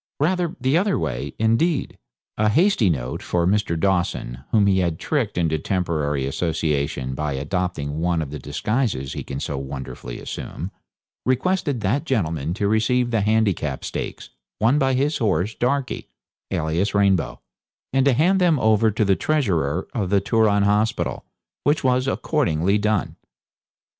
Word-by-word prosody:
Rather 175 +2 +1
the 130 +3 +1
other 195 +3 +2
way, 65 +3 -3
indeed. 115 +9 +1 0.4
A 105 0 +2
hasty 160 - +3
note 65 -6 -2
for 85 -1 0
Mr. 95 -3 +1
Dawson, 90 -9 0
whom 105 -3 +4
he 95 -1 +3
had 85 -3 0
tricked 125 - -1
into 80 -2 +1
temporary 75 -6 -1
association 70 -3 -1
by 75 +1 -2
adopting 75 0 -2
one 85 0 +1
of 75 -3 -4
the 75 - -5
disguises 80 - -1
he - - -5
can 70 0 -5
so 70 -1 -3
wonderfully 65 -3 -7
assume, - - -6 0.5
requested 140 0 0
that 110 +8 +1
gentleman 85 - -1
to 100 - 0
receive 120 +3 +2
the 115 -3 +2
Handicap 100 -10 +1
Stakes, - - -5 0.3
won 120 +7 +3
by 135 -2 +2
his 145 +4 +1
horse, 100 -2 +1
Darkie, 130 +2 -1 0.4
alias 85 +3 -1
Rainbow, 95 -12 +2 0.5
and 135 0 +3
to 140 - +5
hand 180 +9 +3
them 170 -4 +4
over 110 0 +4
to 105 +1 0
the 95 -1 +3
treasurer 90 - 0
of 105 -8 -1
the 100 0 +4
Turon 105 0 +2
Hospital, 105 +3 0 0.4
which 145 +2 +2
was 130 0 +2
accordingly 100 - +1
done. 105 -2 0
100 Hz, 150 wpm, -22 LUFS, 80-125 Hz, 0.5 s, to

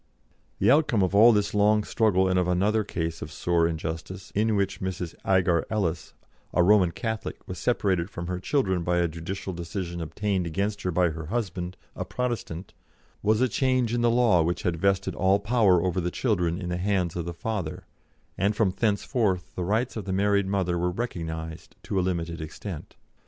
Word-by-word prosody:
The - - +4
outcome 140 -8 +3
of 95 - 0
all 110 +4 +8
this 105 -2 +1
long 105 +1 +4
struggle 100 -4 +2
and 90 0 +2
of 90 - +1
another 100 +5 +2
case 80 -4 -3
of 75 - -6
sore 85 +3 +1
injustice 80 +3 -5
in 110 +1 +2
which 100 -1 -1
Mrs. 95 -3 -3
Agar 90 -3 +3
Ellis, 90 -7 -2 0.4
a 90 - +5
Roman 95 -1 +5
Catholic, 110 +6 -5
was 90 -1 -6
separated 95 -7 +1
from 85 - -6
her 90 +1 -3
children 95 -5 0
by 90 +1 0
a 85 0 +3
judicial 85 +4 -5
decision 85 0 -5
obtained 95 +2 -1
against 100 +5 -2
her 90 - -1
by 90 0 +2
her 80 -1 -7
husband, 95 -4 -3 0.2
a - - -3
Protestant 110 -8 -4 0.5
was 110 +2 +2
a 130 - +4
change 130 -1 +1
in 120 - +1
the 120 - +4
law 115 -7 +4
which 85 +2 -1
had 85 -2 0
vested 100 -1 +1
all 95 +1 +3
power 100 -5 +3
over 90 0 0
the 90 - -1
children 90 -5 0
in 90 -3 -4
the 90 - -1
hands 90 -2 0
of 85 -2 -3
the 85 - -3
father, 95 -5 -4 0.5
and 100 +2 +2
from 105 -3 +2
thenceforth 105 -2 0
the 90 - -3
rights 110 +7 0
of 110 - -5
the 95 - -3
married 100 0 +2
mother 95 -3 0
were 90 +1 +1
recognised 80 -6 -5
to 100 - -1
a - - +3
limited 85 -2 -2
extent. 80 +2 -7
95 Hz, 190 wpm, -26 LUFS, 85-105 Hz, 0.5 s, all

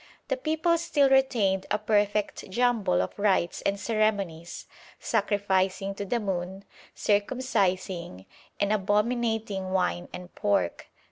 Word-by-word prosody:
'The - - 0
people 335 -4 +1
still 290 -4 +3
retained 225 -8 +2
a - - +2
perfect 210 -1 0
jumble 215 - +2
of 90 - -7
rites 195 -4 +1
and 200 0 -1
ceremonies, 200 -7 -1 0.3
sacrificing 195 -2 0
to 200 - -5
the 235 +4 0
moon, 190 -1 -4 0.3
circumcising, 195 - -1 0.3
and 205 +1 +2
abominating 210 -1 0
wine 180 -1 -1
and 180 0 -9
pork. 205 -1 0
205 Hz, 115 wpm, -27 LUFS, 190-225 Hz, 0.3 s, still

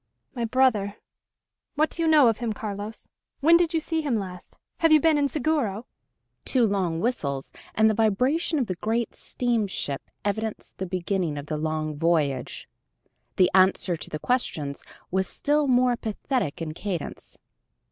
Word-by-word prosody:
"My 240 -4 -2
brother... 225 -5 +2 0.8
what 310 +2 +2
do 335 - -5
you 330 - +2
know 305 -5 +6
of 225 -2 +1
him, 235 -3 -2
Carlos? 210 +1 -6 0.3
When 325 +4 +6
did 340 -1 +3
you 330 - +1
see 320 0 -2
him 275 -7 0
last? 185 -3 -7 0.2
Have 325 -1 +3
you 310 - +8
been 320 +1 +4
in 290 -1 +2
Seguro?" 260 -7 -1 0.6
Two 250 -3 +3
long 185 -6 0
whistles, 140 - -2 0.2
and 220 0 +5
the 220 - +3
vibration 250 - +1
of 265 - +1
the 185 - -2
great 225 +5 -2
steamship 215 - -2 0.2
evidenced 220 +1 -3
the 190 - -3
beginning 180 -3 -1
of 145 - -5
the 155 0 -3
long 155 -1 -2
voyage. 150 -6 0 0.7
The 180 - +4
answer 185 -1 +4
to 160 - -6
the 155 - -3
questions 155 - -1 0.3
was 190 +1 +1
still 295 0 +1
more 250 -1 +4
pathetic 220 - -2
in 155 -1 -5
cadence. 175 -2 -5
215 Hz, 160 wpm, -25 LUFS, 180-260 Hz, 0.8 s, you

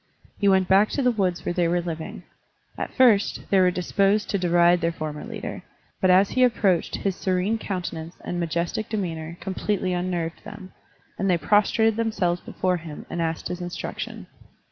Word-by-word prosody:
He 200 - +2
went 190 -1 +4
back 195 +3 +5
to 280 - -1
the 250 - +4
woods 185 -6 -1
where - - -1
they 175 -1 +1
were 175 +1 +1
living. 165 -2 -5 0.5
At - - -4
first, 230 -6 +4
they 195 - +5
were 185 -1 +5
disposed 195 +3 +1
to 200 - 0
deride 175 0 +4
their 165 0 +1
former 155 -2 -5
leader, - - -6 0.4
but 185 - +3
as 190 +2 +5
he 255 - +3
approached 205 -8 +2
his 195 -2 -2
serene 190 +5 0
countenance 175 -4 -5
and 175 - -4
majestic 170 +5 -2
demeanor 170 -6 -4
completely 190 -1 -1
unnerved 175 -2 -3
them, 185 0 -10 0.5
and 195 - +1
they 180 - +4
prostrated 210 +6 +3
themselves 195 -6 0
before 185 -1 -1
him 160 -3 -9
and 170 - -2
asked 165 -1 -2
his 180 0 -5
instruction. 175 0 -5
180 Hz, 175 wpm, -24 LUFS, 170-200 Hz, 0.5 s, back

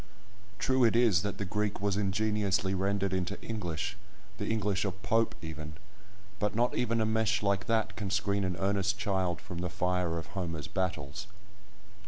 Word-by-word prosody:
True 130 +2 +3
it 115 -1 +5
is, 115 -9 +5
that 100 +1 -3
the 100 - -2
Greek 105 +2 -1
was 100 0 +1
ingeniously 100 -1 +1
rendered 100 0 +1
into 95 +2 -1
English, 90 -8 -3 0.4
the - - -2
English 105 -3 +1
of 100 -1 -3
Pope 115 +1 +2
even, 80 -1 -6 0.7
but 105 0 0
not 120 +2 +2
even 115 -2 +1
a 110 - +3
mesh 110 -1 +2
like 100 -2 +1
that 115 -1 +1
can 100 -3 -3
screen 100 +1 +1
an 90 -2 0
earnest 100 +2 +1
child 95 -4 0
from 90 - -7
the 90 0 -1
fire 90 -1 0
of 80 - -4
Homer's 85 -6 -3
battles. 90 -2 -2
100 Hz, 170 wpm, -31 LUFS, 90-105 Hz, 0.7 s, it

